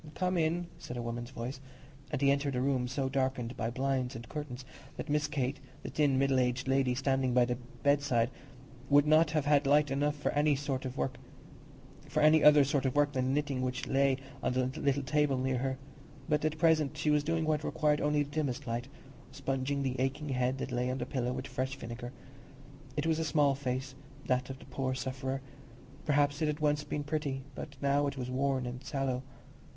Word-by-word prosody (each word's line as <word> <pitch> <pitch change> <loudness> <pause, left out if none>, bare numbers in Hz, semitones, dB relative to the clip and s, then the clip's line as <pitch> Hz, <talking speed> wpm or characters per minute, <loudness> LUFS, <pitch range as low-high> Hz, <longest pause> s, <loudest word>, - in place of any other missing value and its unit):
"Come 185 0 0
in," 170 +1 +1
said 125 - -7
a - - -2
woman's 120 0 -4
voice, 130 +1 -5 0.5
and - - -2
he 140 - +6
entered 140 -1 0
a - - +1
room 130 -2 +1
so 130 +2 -1
darkened 130 -2 -1
by 110 +3 -2
blinds 130 0 -1
and 115 +1 -8
curtains 135 -4 -6 0.3
that 150 - -5
Miss 150 0 +2
Kate, 140 -2 -2 0.2
the - - -5
thin 145 -3 +2
middle 135 -1 +3
aged 125 +1 0
lady 135 -1 +2
standing 135 -1 +1
by 125 -1 +6
the 125 0 -2 0.3
bedside, 140 -4 +2 0.6
would 145 0 +6
not 155 +1 +5
have 150 -2 0
had 145 -1 +3
light 145 0 +4
enough 145 +2 +1
for 145 - -1
any 150 +1 +3 1.9
other 150 -1 +8
sort 140 0 0
of 130 - -2
work 145 0 +4
than 130 -2 0
the - - +1
knitting 140 -2 0
which 125 -1 -2
lay 135 -1 +3 0.2
on - - 0
the 130 0 +1
little 140 0 +1
table 145 0 +2
near 130 0 0
her. 130 +1 -1 0.5
But 150 -2 +1
at 155 0 0
present 155 -2 +3
she 150 +1 +1
was 150 -1 +3
doing 165 +1 0
what 155 -1 +1
required 150 -1 +1
only 150 0 +2
the 145 - -10
dimmest 145 -2 -2
light—sponging 135 +2 -4
the 130 -1 -2
aching 140 +3 -1
head 130 0 0
that 135 - -4
lay 125 +1 0
on 130 - -1
the 125 - -3
pillow 125 -2 -1
with 130 +1 -4
fresh 130 0 -3
vinegar. 120 -1 -7 0.9
It 150 - 0
was 160 -1 +2
a - - +1
small 145 -2 +3
face, 130 -1 -3 0.3
that 125 0 0
of 135 - -5
the - - -14
poor 130 -1 -2
sufferer; 130 +1 -3 0.6
perhaps 145 0 +2
it 155 - +2
had 150 0 -1
once 150 -1 +1
been 145 0 -3
pretty, 145 -3 -2
but 140 +1 -8
now 140 +1 +3
it 140 - -4
was 125 -1 -4
worn 130 0 0
and 125 +1 -6
sallow. 135 -3 -1
135 Hz, 200 wpm, -32 LUFS, 130-145 Hz, 1.9 s, other